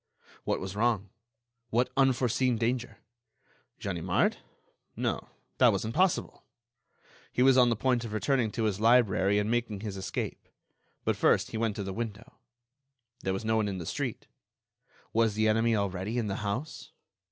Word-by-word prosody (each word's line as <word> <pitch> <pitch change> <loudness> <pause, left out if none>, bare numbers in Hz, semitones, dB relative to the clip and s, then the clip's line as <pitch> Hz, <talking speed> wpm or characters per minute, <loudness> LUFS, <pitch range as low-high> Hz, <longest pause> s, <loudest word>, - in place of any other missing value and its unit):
What - - 0
was 95 +1 -6
wrong? 105 -3 0 0.6
What 120 +3 +1
unforeseen 130 -2 +2
danger? 120 +2 -1 0.8
Ganimard? 90 -1 0 0.6
No; - - -2 0.3
that - - +7
wasn't 110 - -2
possible! 185 +1 +1 0.9
He 125 - +2
was 135 0 +6
on 125 -2 +6
the 115 - +2
point 125 +1 +1
of 115 - -6
returning 120 +2 +1
to 115 - -1
his 105 -3 0
library 110 -4 +4
and 105 +2 0
making 115 -4 -1
his 105 -3 -5
escape. 95 - -4 0.6
But, - - +1
first, - - +3
he - - -3
went 110 -2 0
to 100 - -3
the 95 0 -4
window. 110 0 -6 0.8
There 95 - -2
was 95 +4 -3
no 110 0 +2
one 110 -1 +1
in 95 -2 -3
the 85 - -6
street. - - -3 0.9
Was 115 -2 +2
the 110 0 +2
enemy 115 +1 +3
already 100 +2 -2
in 120 - 0
the 100 -2 -2
house? 110 +9 -4
110 Hz, 160 wpm, -29 LUFS, 100-120 Hz, 0.9 s, that